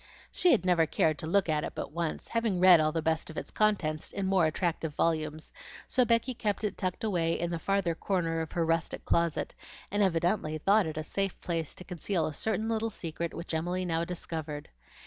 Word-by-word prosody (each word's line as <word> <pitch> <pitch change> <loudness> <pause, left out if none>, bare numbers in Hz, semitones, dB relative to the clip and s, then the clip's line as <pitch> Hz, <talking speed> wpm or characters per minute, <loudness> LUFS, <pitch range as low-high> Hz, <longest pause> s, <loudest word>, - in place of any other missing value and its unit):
She 360 - +3
had 205 -7 +3
never 170 -3 +4
cared 155 0 +1
to 160 - -5
look 195 +3 +3
at 155 -1 +1
it - - -4
but - - -5
once, 165 0 -3
having 230 -5 0
read 180 -2 +8
all 155 0 +2
the 165 0 -2
best 160 +1 0
of 160 - -9
its - - -5
contents 180 -8 +1
in 200 - -3
more 190 -4 +3
attractive 160 -2 -2
volumes, 155 -1 -1 0.3
so 255 -1 +3
Becky 230 +3 +2
kept 215 -2 -2
it 210 - -1
tucked 185 0 -3
away 170 -6 +1
in 170 0 -1
the 170 - -2
farther 195 -2 +1
corner 165 -2 -1
of 160 - -6
her 170 -1 +1
rustic 165 0 -1
closet, 170 -2 +1 0.4
and 205 +1 +1
evidently 170 -3 +1
thought 200 +4 +3
it 155 -1 -5
a 155 - -2
safe 195 +4 -2
place 165 -3 -3
to - - -8
conceal 180 -1 -1
a 155 - -3
certain 220 +5 -1
little 225 0 0
secret 170 -4 -4
which 170 - -6
Emily 175 +3 -1
now 165 -1 0
discovered. 160 -4 -5
170 Hz, 210 wpm, -30 LUFS, 160-195 Hz, 0.4 s, read